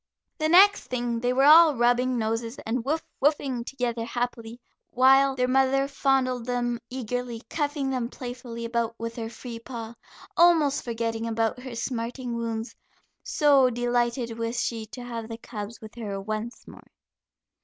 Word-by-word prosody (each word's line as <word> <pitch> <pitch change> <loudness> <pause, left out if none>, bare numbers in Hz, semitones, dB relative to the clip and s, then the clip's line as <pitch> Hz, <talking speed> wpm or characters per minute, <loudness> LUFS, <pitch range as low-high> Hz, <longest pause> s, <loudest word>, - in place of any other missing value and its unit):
The 310 0 +1
next 395 +4 +6
thing 240 -2 -2
they 245 +1 0
were 260 +2 +2
all 310 +1 +8
rubbing 245 +1 +2
noses 225 +2 -2
and 230 +2 -1
"woof, 310 +5 -1 0.2
woofing" 275 -4 +1
together 245 -3 -3
happily, 235 -1 -4 0.3
while 270 +2 +5
their 250 -1 +1
mother 270 +1 +3
fondled 260 -3 0
them 240 -1 -1
eagerly, 245 -1 -4
cuffing 290 -3 -1
them 250 -3 -2
playfully 245 -2 -7
about 230 -1 -1
with 230 0 -5
her 225 -1 -4
free 235 0 -8
paw, 230 -1 -7 0.4
almost 325 -5 +4
forgetting 230 -1 -2
about 225 +1 -1
her 250 -1 -8
smarting 240 +1 -3
wounds, 230 0 -4 0.5
so 280 -4 +4
delighted 240 -1 -1
was 230 +1 -1
she 225 -2 -3
to 245 +3 -9
have 230 -2 -6
the 225 - -6
cubs 220 -1 -7
with 215 -1 -11
her 210 -4 -5
once 215 +4 -5
more. - - -14
245 Hz, 155 wpm, -26 LUFS, 230-265 Hz, 0.5 s, all